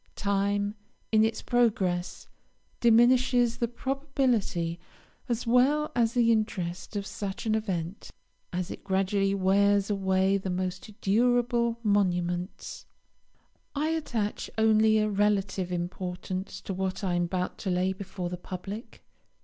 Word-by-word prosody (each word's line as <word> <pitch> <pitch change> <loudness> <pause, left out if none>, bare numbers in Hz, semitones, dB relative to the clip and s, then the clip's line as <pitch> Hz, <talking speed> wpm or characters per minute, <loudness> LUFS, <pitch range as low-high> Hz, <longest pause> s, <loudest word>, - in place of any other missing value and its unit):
Time, 200 0 0 0.4
in 220 -1 +5
its 220 0 -1
progress, 195 -7 0 0.5
diminishes 240 0 +4
the 235 - 0
probability 245 - -1 0.5
as 235 0 -1
well 270 +6 +3
as 235 -1 +2
the 235 -1 +4
interest 190 -4 -2
of 200 -1 -2
such 195 +1 -5
an 220 - +1
event, 190 -4 -3 0.4
as 180 +1 -3
it - - -8
gradually 195 0 +1
wears 200 +1 +3
away 190 0 +2
the 190 - -4
most 185 +3 -4
durable 235 +2 +2
monuments. 180 -3 -1 0.9
I 300 +2 0
attach 240 -10 -2
only 220 0 +4
a 215 0 +2
relative 200 -3 0
importance 180 +1 -4
to 195 - -5
what 190 +2 -3
I 185 -2 0
am 175 0 +1
about 180 +1 -3
to 195 - -3
lay 185 +1 +1
before 185 -2 -5
the 180 - -5
public. 195 +5 -8
200 Hz, 125 wpm, -28 LUFS, 185-230 Hz, 0.9 s, in